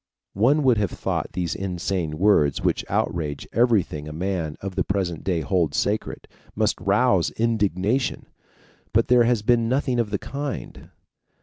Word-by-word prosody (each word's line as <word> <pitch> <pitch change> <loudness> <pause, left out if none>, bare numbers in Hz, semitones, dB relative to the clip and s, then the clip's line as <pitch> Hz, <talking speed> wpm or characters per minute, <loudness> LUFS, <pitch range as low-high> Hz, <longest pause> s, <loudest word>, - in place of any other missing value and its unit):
One 135 +9 +3
would 125 -5 +4
have 100 -3 0
thought - - -3
these 90 -3 -2
insane 90 -4 -3
words, 80 -7 +3
which - - +1
outrage 75 -4 -2
everything 105 -11 +1
a - - -6
man 85 -2 -3
of 100 -1 -5
the 95 0 0
present 95 -4 -2
day 90 -4 0
holds 80 -2 0
sacred, - - -2 0.3
must - - 0
rouse - - +3
indignation. 110 - 0 0.7
But 115 +2 +2
there 120 -1 +5
has 120 -3 +1
been 115 0 +2
nothing 130 -1 0
of 115 -3 0
the 100 - -1
kind. 140 +4 -6
100 Hz, 150 wpm, -24 LUFS, 85-115 Hz, 0.7 s, there